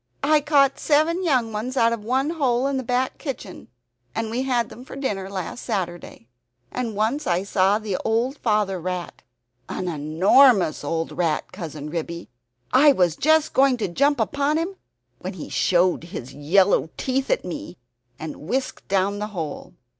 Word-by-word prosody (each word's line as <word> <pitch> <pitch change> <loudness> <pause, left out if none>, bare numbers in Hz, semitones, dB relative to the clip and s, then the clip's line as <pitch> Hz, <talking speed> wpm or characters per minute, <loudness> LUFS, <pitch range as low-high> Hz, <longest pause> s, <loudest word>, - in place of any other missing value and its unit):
"I 300 +1 +4
caught 280 -2 +3
seven 320 +4 +2
young 250 -9 +1
ones 245 +5 -4
out 230 -1 +4
of 225 -3 -5
one 265 +6 0
hole 260 -6 +1
in 275 -1 0
the 260 - -2
back 250 +2 -1
kitchen, 250 - -7 0.5
and 225 -1 -2
we 245 +3 -1
had 245 -3 0
them 245 - -11
for 265 - -10
dinner 205 -9 -3
last 195 +4 -5
Saturday. 175 - -4 0.4
And 235 -4 -3
once 225 +8 0
I 180 +1 +1
saw 200 0 +2
the 210 -4 -3
old 235 +5 -1
father 210 -4 +1
rat 180 0 -5 0.5
an 185 - -3
enormous 175 - +4
old 165 +2 -2
rat 165 -4 -1
Cousin 155 -5 -7
Ribby. 170 0 -5 0.4
I 285 +3 +7
was 175 - +2
just 315 - +3
going 265 -1 +4
to 220 - -1
jump 280 +10 +2
upon 285 +6 +1
him, 345 +4 -2 0.4
when - - -5
he - - -8
showed 180 -1 +2
his 135 -6 -8
yellow 170 +3 +3
teeth 265 +1 -1
at - - +1
me 295 -10 -6 0.4
and 160 - -6
whisked 255 - -3
down 200 +1 +1
the 210 - -2
hole. 155 -3 -5
220 Hz, 170 wpm, -23 LUFS, 180-270 Hz, 0.5 s, I